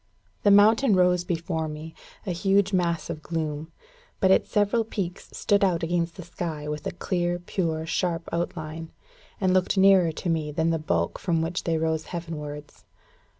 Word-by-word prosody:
The 205 Hz, -, +4 dB
mountain 215 Hz, +3 st, +6 dB
rose 180 Hz, -1 st, +3 dB
before 165 Hz, -2 st, -2 dB
me, 155 Hz, +1 st, -7 dB, 0.3 s
a 185 Hz, -, -2 dB
huge 195 Hz, +2 st, +2 dB
mass 170 Hz, -3 st, 0 dB
of 155 Hz, -, -5 dB
gloom; 155 Hz, -1 st, -4 dB, 0.5 s
but 190 Hz, -, +4 dB
its -, -, +3 dB
several 210 Hz, +3 st, +2 dB
peaks 195 Hz, -5 st, -5 dB
stood 205 Hz, -2 st, +1 dB
out 175 Hz, -4 st, +2 dB
against 170 Hz, 0 st, -1 dB
the 180 Hz, -, -8 dB
sky 165 Hz, -3 st, -5 dB
with 150 Hz, 0 st, -4 dB
a -, -, -2 dB
clear, 175 Hz, -1 st, -1 dB
pure, 165 Hz, -3 st, -2 dB
sharp 165 Hz, 0 st, -1 dB
outline, 160 Hz, -1 st, -4 dB, 0.5 s
and 185 Hz, -3 st, +2 dB
looked 185 Hz, +1 st, +2 dB
nearer 190 Hz, -3 st, +6 dB
to 160 Hz, -, -6 dB
me 160 Hz, -3 st, 0 dB
than 160 Hz, +2 st, +1 dB
the 165 Hz, -, 0 dB
bulk 85 Hz, -, -1 dB
from 165 Hz, -3 st, 0 dB
which 170 Hz, +2 st, -3 dB
they 165 Hz, -1 st, +1 dB
rose 160 Hz, 0 st, -1 dB
heaven 170 Hz, -2 st, -5 dB
wards. 150 Hz, 0 st, -8 dB
170 Hz, 175 wpm, -26 LUFS, 160-185 Hz, 0.5 s, mountain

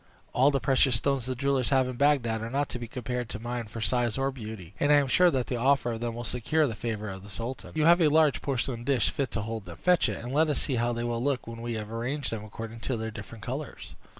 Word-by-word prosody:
All 130 Hz, +3 st, +5 dB
the 140 Hz, -1 st, +1 dB
precious 130 Hz, 0 st, +3 dB
stones 130 Hz, +2 st, 0 dB
the 130 Hz, -, -1 dB
jewellers 135 Hz, -1 st, +1 dB
have 130 Hz, -2 st, +3 dB
in 130 Hz, -, -4 dB
Bagdad 120 Hz, -5 st, +2 dB
are 115 Hz, -, -4 dB
not 140 Hz, +3 st, 0 dB
to 125 Hz, -, -5 dB
be 120 Hz, -, -6 dB
compared 125 Hz, 0 st, -4 dB
to 110 Hz, -, -5 dB
mine 120 Hz, +1 st, -4 dB
for 115 Hz, +2 st, -7 dB
size 120 Hz, 0 st, +1 dB
or 135 Hz, 0 st, +1 dB
beauty; 110 Hz, -8 st, -8 dB
and 145 Hz, -, +3 dB
I -, -, +8 dB
am 145 Hz, -1 st, +4 dB
sure 180 Hz, +7 st, +5 dB
that 130 Hz, -6 st, 0 dB
the 125 Hz, -, -2 dB
offer 130 Hz, 0 st, +2 dB
of 115 Hz, -, -4 dB
them 120 Hz, -1 st, -3 dB
will 120 Hz, -, -5 dB
secure 125 Hz, +7 st, +1 dB
the 120 Hz, -, -2 dB
favor 110 Hz, -1 st, -4 dB
of 95 Hz, -1 st, -6 dB
the 100 Hz, -, -12 dB
sultan. 115 Hz, +6 st, -6 dB
You 155 Hz, -1 st, +2 dB
have 170 Hz, +2 st, +6 dB
a 160 Hz, -, +6 dB
large 155 Hz, -1 st, +4 dB
porcelain 130 Hz, -3 st, -2 dB
dish 125 Hz, -3 st, +2 dB
fit 140 Hz, -3 st, -1 dB
to 110 Hz, -, -1 dB
hold 110 Hz, -1 st, -5 dB
them; 85 Hz, -1 st, -9 dB
fetch 180 Hz, -2 st, +3 dB
it, -, -, -3 dB
and 125 Hz, +2 st, -5 dB
let 155 Hz, +2 st, +3 dB
us 150 Hz, -, +1 dB
see 130 Hz, -4 st, 0 dB
how 120 Hz, +1 st, +1 dB
they 120 Hz, 0 st, -2 dB
will 120 Hz, 0 st, -1 dB
look, 140 Hz, -2 st, 0 dB
when 115 Hz, 0 st, -8 dB
we 120 Hz, -1 st, -3 dB
have 105 Hz, 0 st, -5 dB
arranged 125 Hz, +5 st, -2 dB
them 110 Hz, -2 st, -4 dB
according 110 Hz, +1 st, -8 dB
to 125 Hz, +2 st, -2 dB
their 110 Hz, 0 st, -4 dB
different 115 Hz, -1 st, -9 dB
colors." 135 Hz, +4 st, -6 dB
120 Hz, 280 wpm, -28 LUFS, 115-140 Hz, -, I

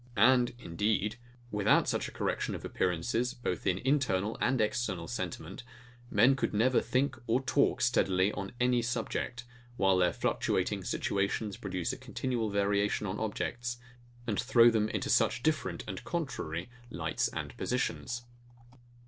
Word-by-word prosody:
And, 120 Hz, +3 st, +5 dB
indeed, 105 Hz, +1 st, -1 dB, 0.3 s
without 105 Hz, 0 st, +3 dB
such -, -, 0 dB
a -, -, -9 dB
correction -, -, -2 dB
of -, -, -7 dB
appearances, 115 Hz, +8 st, 0 dB
both 110 Hz, -7 st, -3 dB
in 90 Hz, -1 st, +2 dB
internal 115 Hz, -7 st, +1 dB
and 130 Hz, +1 st, +2 dB
external 105 Hz, -5 st, -1 dB
sentiment, 80 Hz, +4 st, -5 dB, 0.5 s
men 120 Hz, +5 st, +5 dB
could 130 Hz, -, -1 dB
never 125 Hz, +4 st, +4 dB
think 130 Hz, -1 st, 0 dB
or 115 Hz, +3 st, +3 dB
talk 135 Hz, 0 st, +2 dB
steadily 95 Hz, -6 st, +3 dB
on 100 Hz, -2 st, -5 dB
any 125 Hz, -1 st, +3 dB
subject; 120 Hz, 0 st, -3 dB, 0.3 s
while 95 Hz, -1 st, +4 dB
their 90 Hz, -1 st, +3 dB
fluctuating -, -, 0 dB
situations 100 Hz, +1 st, -1 dB
produce 95 Hz, -3 st, -3 dB
a -, -, -6 dB
continual 120 Hz, -4 st, -2 dB
variation 100 Hz, +1 st, +1 dB
on 100 Hz, +1 st, -3 dB
objects, 120 Hz, +3 st, -3 dB, 0.5 s
and 110 Hz, -4 st, -1 dB
throw 120 Hz, -2 st, +6 dB
them 110 Hz, -1 st, +1 dB
into -, -, -2 dB
such 120 Hz, -, +2 dB
different 120 Hz, -, 0 dB
and 95 Hz, -, -5 dB
contrary 95 Hz, -, -3 dB, 0.2 s
lights -, -, -1 dB
and -, -, -5 dB
positions. 120 Hz, 0 st, -2 dB
110 Hz, 140 wpm, -31 LUFS, 100-125 Hz, 0.5 s, throw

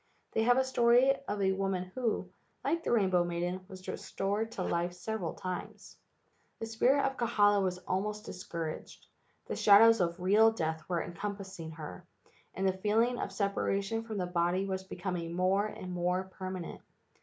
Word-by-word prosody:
They 220 Hz, -, +1 dB
have 245 Hz, +2 st, +4 dB
a 265 Hz, -, +4 dB
story 250 Hz, +1 st, +4 dB
of 205 Hz, -1 st, -1 dB
a 190 Hz, -, +3 dB
woman 190 Hz, -1 st, -2 dB
who, 240 Hz, -2 st, -1 dB, 0.4 s
like 335 Hz, 0 st, 0 dB
the -, -, -1 dB
rainbow 190 Hz, -6 st, +3 dB
maiden, 175 Hz, +2 st, -2 dB
was 185 Hz, -1 st, -11 dB
restored 205 Hz, +3 st, -2 dB
to 185 Hz, -, -3 dB
life 175 Hz, 0 st, -1 dB
several 180 Hz, -1 st, -4 dB
times. 185 Hz, -1 st, -6 dB, 0.6 s
The -, -, -4 dB
spirit 245 Hz, +5 st, +2 dB
of 270 Hz, 0 st, -1 dB
Kahala 205 Hz, -4 st, +3 dB
was 185 Hz, -1 st, 0 dB
almost 210 Hz, +3 st, -2 dB
discouraged. 165 Hz, -3 st, -6 dB, 0.4 s
The -, -, -4 dB
shadows 225 Hz, +1 st, +7 dB
of 170 Hz, 0 st, 0 dB
real 205 Hz, +5 st, +5 dB
death 160 Hz, -5 st, -2 dB
were 175 Hz, -2 st, 0 dB
encompassing 190 Hz, -1 st, -6 dB
her, 160 Hz, +3 st, -8 dB, 0.5 s
and 190 Hz, +1 st, 0 dB
the 190 Hz, -, +2 dB
feeling 220 Hz, +6 st, +1 dB
of -, -, -3 dB
separation 200 Hz, +1 st, -1 dB
from 225 Hz, -2 st, -6 dB
the 185 Hz, -, 0 dB
body 180 Hz, +2 st, +1 dB
was 190 Hz, -1 st, -3 dB
becoming 175 Hz, -3 st, -4 dB
more 190 Hz, +3 st, +2 dB
and 185 Hz, -3 st, -7 dB
more 180 Hz, +1 st, 0 dB
permanent. 185 Hz, -2 st, -6 dB
190 Hz, 165 wpm, -31 LUFS, 180-220 Hz, 0.6 s, shadows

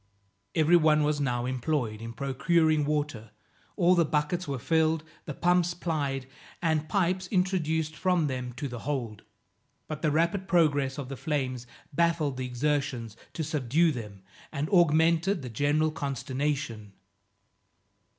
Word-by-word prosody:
Every 165 Hz, +2 st, +5 dB
one 155 Hz, -2 st, +4 dB
was 150 Hz, 0 st, 0 dB
now 120 Hz, -3 st, 0 dB
employed 125 Hz, -4 st, -2 dB
in 115 Hz, 0 st, -6 dB
procuring 150 Hz, +4 st, +2 dB
water; 145 Hz, -7 st, -2 dB, 0.5 s
all 180 Hz, -2 st, +4 dB
the 170 Hz, -2 st, +4 dB
buckets 150 Hz, +3 st, -1 dB
were 140 Hz, -1 st, -2 dB
filled, 160 Hz, +4 st, +1 dB, 0.2 s
the 150 Hz, -, -5 dB
pumps 175 Hz, 0 st, +2 dB
plied, 145 Hz, -6 st, -2 dB, 0.3 s
and 160 Hz, -2 st, 0 dB
pipes 185 Hz, +1 st, +1 dB
introduced 160 Hz, -5 st, 0 dB
from 180 Hz, -1 st, +1 dB
them 130 Hz, -3 st, -3 dB
to 130 Hz, +4 st, -4 dB
the 120 Hz, -2 st, -6 dB
hold. 125 Hz, -7 st, -3 dB, 0.7 s
But 155 Hz, -1 st, -5 dB
the 155 Hz, -, +2 dB
rapid 170 Hz, +5 st, +1 dB
progress 145 Hz, -7 st, +2 dB
of 140 Hz, -3 st, -5 dB
the 135 Hz, 0 st, -6 dB
flames 130 Hz, -5 st, -2 dB, 0.3 s
baffled 160 Hz, -4 st, +1 dB
the 130 Hz, -1 st, -3 dB
exertions 125 Hz, -3 st, -1 dB, 0.2 s
to 160 Hz, -, -3 dB
subdue 155 Hz, +2 st, +2 dB
them, 105 Hz, -7 st, -8 dB, 0.3 s
and 145 Hz, 0 st, -2 dB
augmented 170 Hz, +1 st, +3 dB
the 125 Hz, -, -5 dB
general 145 Hz, +6 st, +1 dB
consternation. 135 Hz, -6 st, -3 dB
150 Hz, 140 wpm, -28 LUFS, 130-165 Hz, 0.7 s, Every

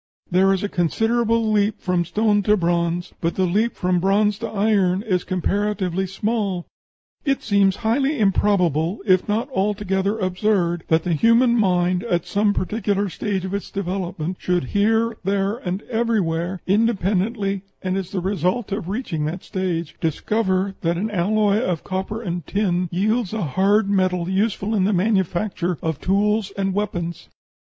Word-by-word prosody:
There 190 Hz, +2 st, +4 dB
is 195 Hz, 0 st, 0 dB
a -, -, +1 dB
considerable 225 Hz, +5 st, +1 dB
leap 210 Hz, 0 st, +1 dB
from 180 Hz, -2 st, 0 dB
stone 210 Hz, +3 st, +2 dB
to 210 Hz, +1 st, +3 dB
bronze, 170 Hz, 0 st, -1 dB
but 165 Hz, 0 st, -1 dB
the 190 Hz, -, +2 dB
leap 210 Hz, +7 st, +1 dB
from 180 Hz, 0 st, +1 dB
bronze 200 Hz, +2 st, +2 dB
to -, -, -3 dB
iron 200 Hz, -3 st, +1 dB
is 185 Hz, -5 st, 0 dB
comparatively 190 Hz, 0 st, -1 dB
small.... 195 Hz, -2 st, -2 dB, 0.6 s
It 275 Hz, -2 st, 0 dB
seems 200 Hz, -3 st, +3 dB
highly 270 Hz, +6 st, +2 dB
improbable, 185 Hz, -4 st, +2 dB
if 185 Hz, -1 st, +3 dB
not 225 Hz, +5 st, 0 dB
altogether 200 Hz, -1 st, 0 dB
absurd, 185 Hz, -3 st, 0 dB
that 160 Hz, 0 st, +2 dB
the 175 Hz, -, 0 dB
human 230 Hz, -, +4 dB
mind, 180 Hz, -4 st, +2 dB
at 175 Hz, -6 st, 0 dB
some 205 Hz, +3 st, +1 dB
particular 205 Hz, 0 st, -1 dB
stage 190 Hz, 0 st, -3 dB
of 190 Hz, -, -5 dB
its 200 Hz, -, -3 dB
development, 180 Hz, -3 st, -3 dB
should 180 Hz, -3 st, 0 dB
here, 225 Hz, +2 st, +2 dB
there, 195 Hz, +2 st, 0 dB
and 190 Hz, -3 st, -4 dB
everywhere 190 Hz, -7 st, -1 dB
independently, 200 Hz, -1 st, +1 dB, 0.2 s
and 185 Hz, 0 st, -1 dB
as 190 Hz, -2 st, -3 dB
the 190 Hz, -2 st, -3 dB
result 190 Hz, +4 st, -1 dB
of 195 Hz, -3 st, -3 dB
reaching 190 Hz, -, -2 dB
that 170 Hz, +4 st, -4 dB
stage 175 Hz, -4 st, -3 dB
discover 190 Hz, +3 st, 0 dB
that 170 Hz, 0 st, 0 dB
an 215 Hz, +4 st, -2 dB
alloy 205 Hz, +2 st, +2 dB
of 180 Hz, -9 st, -1 dB
copper 190 Hz, +4 st, -4 dB
and 175 Hz, -5 st, -4 dB
tin 180 Hz, -4 st, 0 dB
yields 215 Hz, +3 st, 0 dB
a 215 Hz, -, -1 dB
hard 195 Hz, +7 st, +2 dB
metal 185 Hz, -3 st, +1 dB
useful 200 Hz, +2 st, 0 dB
in 195 Hz, -4 st, +2 dB
the 205 Hz, -, +2 dB
manufacture 185 Hz, -2 st, 0 dB
of 160 Hz, -3 st, -2 dB
tools 205 Hz, +2 st, +1 dB
and 195 Hz, -1 st, 0 dB
weapons. 175 Hz, -5 st, -3 dB
195 Hz, 155 wpm, -22 LUFS, 180-210 Hz, 0.6 s, There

